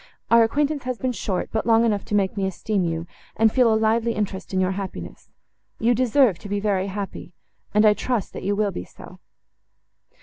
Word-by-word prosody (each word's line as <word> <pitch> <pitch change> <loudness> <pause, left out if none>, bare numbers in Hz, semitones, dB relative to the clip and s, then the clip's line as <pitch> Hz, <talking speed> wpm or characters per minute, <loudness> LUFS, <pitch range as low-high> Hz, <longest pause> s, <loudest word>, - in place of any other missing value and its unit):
Our 230 0 +7
acquaintance 285 +4 0
has 255 -1 -2
been 255 +1 -1
short, 195 -6 -3
but 220 +1 -2
long 225 0 +5
enough 205 -3 0
to 210 - -2
make 195 -1 +1
me 195 -2 0
esteem 195 +1 -1
you, 165 -1 -2 0.3
and 220 0 +4
feel 245 -2 +4
a 220 - +3
lively 225 +1 +1
interest 205 -3 -4
in 190 - 0
your 185 0 +1
happiness. 190 0 -7 0.5
You 235 +2 +2
deserve 245 - +3
to 205 - -10
be 205 0 -1
very 200 -2 0
happy, 195 -2 -6 0.4
and 210 +1 +4
I 210 - +7
trust 235 -2 -2
that - - -6
you 200 +2 0
will 205 -1 0
be 90 - -5
so." - - -14
210 Hz, 205 wpm, -23 LUFS, 195-230 Hz, 0.5 s, Our